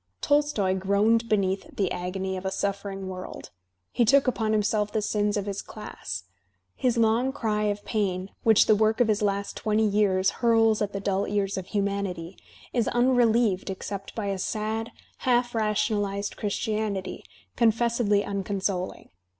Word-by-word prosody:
Tolstoy 290 Hz, -10 st, +2 dB
groaned 205 Hz, +5 st, +2 dB
beneath 195 Hz, -2 st, 0 dB
the 190 Hz, -3 st, 0 dB
agony 190 Hz, +1 st, -3 dB
of 185 Hz, -, -5 dB
a 190 Hz, -, -1 dB
suffering 195 Hz, 0 st, -3 dB
world; 185 Hz, 0 st, -7 dB, 0.4 s
he 240 Hz, -, +2 dB
took 275 Hz, +4 st, +5 dB
upon 225 Hz, -3 st, 0 dB
himself 210 Hz, 0 st, +1 dB
the 220 Hz, -, 0 dB
sins 210 Hz, 0 st, 0 dB
of 200 Hz, -, -2 dB
his 200 Hz, -1 st, -3 dB
class. 90 Hz, -, -7 dB, 0.6 s
BDs 245 Hz, -2 st, +2 dB
long 230 Hz, +3 st, +3 dB
cry 215 Hz, -6 st, -1 dB
of 205 Hz, 0 st, -2 dB
pain, 195 Hz, -3 st, -1 dB
which 220 Hz, -2 st, +5 dB
the 215 Hz, -, +5 dB
work 215 Hz, +2 st, +2 dB
of 245 Hz, -, +4 dB
his 215 Hz, 0 st, +1 dB
last 200 Hz, -1 st, -1 dB
twenty 220 Hz, 0 st, +1 dB
years 200 Hz, -2 st, +2 dB
hurls 225 Hz, -2 st, +4 dB
at 205 Hz, -1 st, 0 dB
the 200 Hz, -, -4 dB
dull 195 Hz, 0 st, 0 dB
ears 200 Hz, -1 st, -1 dB
of 190 Hz, -1 st, -5 dB
hiunanity, 200 Hz, -4 st, -2 dB, 0.4 s
is 235 Hz, -3 st, +1 dB
unrelieved 240 Hz, -5 st, +2 dB
except 195 Hz, +1 st, -6 dB
by 220 Hz, -, -3 dB
a 195 Hz, -1 st, -2 dB
sad, 220 Hz, +3 st, -2 dB, 0.3 s
half 245 Hz, -1 st, +1 dB
rationalized 205 Hz, -2 st, 0 dB
Christianity, 210 Hz, -1 st, -2 dB, 0.3 s
confessedly 230 Hz, -2 st, +2 dB
uncon 200 Hz, 0 st, -3 dB
soling. 185 Hz, -1 st, -3 dB
205 Hz, 155 wpm, -26 LUFS, 195-225 Hz, 0.6 s, took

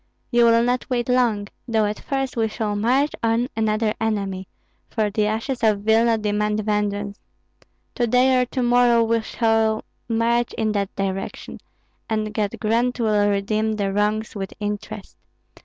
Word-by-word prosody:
"You 240 Hz, -1 st, +5 dB
will 230 Hz, 0 st, +5 dB
not 245 Hz, +1 st, -1 dB
wait 240 Hz, -2 st, -1 dB
long, 240 Hz, -5 st, +1 dB, 0.2 s
though 220 Hz, -2 st, +2 dB
at 210 Hz, 0 st, -3 dB
first 270 Hz, -2 st, -3 dB
we 225 Hz, -2 st, +1 dB
shall 215 Hz, -1 st, -3 dB
march 255 Hz, +8 st, +2 dB
on 230 Hz, +2 st, +1 dB
another 215 Hz, 0 st, +1 dB
enemy, 195 Hz, -4 st, -2 dB, 0.4 s
for 215 Hz, -3 st, -1 dB
the 210 Hz, 0 st, +1 dB
ashes 230 Hz, +4 st, -2 dB
of 215 Hz, -3 st, +2 dB
Vilna 225 Hz, +2 st, +3 dB
demand 210 Hz, 0 st, 0 dB
vengeance. 205 Hz, -1 st, -2 dB, 0.7 s
To 240 Hz, -, 0 dB
day 255 Hz, +2 st, +4 dB
or 250 Hz, -, -1 dB
to 255 Hz, +1 st, -2 dB
morrow 240 Hz, -1 st, +4 dB
we 230 Hz, 0 st, +1 dB
shall 225 Hz, -1 st, +1 dB, 0.3 s
march 235 Hz, +1 st, +1 dB
in 220 Hz, -1 st, -1 dB
that 200 Hz, -2 st, -2 dB
direction, 195 Hz, -1 st, -4 dB, 0.5 s
and 215 Hz, -1 st, -1 dB
God 210 Hz, 0 st, -1 dB
grant 235 Hz, +3 st, 0 dB
will 210 Hz, -3 st, +2 dB
redeem 215 Hz, +2 st, 0 dB
the 200 Hz, -2 st, -1 dB
wrongs 210 Hz, +2 st, 0 dB
with 195 Hz, -2 st, -5 dB
interest. 210 Hz, 0 st, -5 dB
220 Hz, 155 wpm, -22 LUFS, 210-235 Hz, 0.7 s, You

